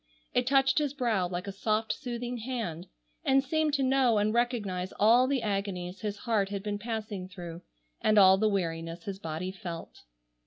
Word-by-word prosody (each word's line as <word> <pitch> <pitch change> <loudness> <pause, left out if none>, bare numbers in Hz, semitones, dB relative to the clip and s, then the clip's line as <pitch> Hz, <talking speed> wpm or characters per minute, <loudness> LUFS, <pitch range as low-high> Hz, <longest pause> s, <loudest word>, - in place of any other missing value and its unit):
It 245 0 +1
touched 270 +1 +4
his 290 -2 -1
brow 225 -9 +1
like 175 0 -4
a 200 - -4
soft 215 +2 0
soothing 245 -2 -4
hand, 220 -8 -4 0.4
and 270 -3 +4
seemed 305 +1 +1
to 275 - +1
know 260 -3 +3
and 210 +1 +2
recognize 210 -7 -1
all 235 +5 +5
the 265 -3 0
agonies 195 -3 -3
his 210 -1 -3
heart 215 -5 +1
had 200 -1 -4
been 205 -1 -3
passing 215 -4 -4
through, 175 -2 -8 0.4
and 215 0 +3
all 190 -1 +7
the 215 0 +3
weariness 165 -3 -2
his 195 -1 -5
body 165 +2 -4
felt. 175 -3 -8
210 Hz, 180 wpm, -29 LUFS, 185-245 Hz, 0.4 s, all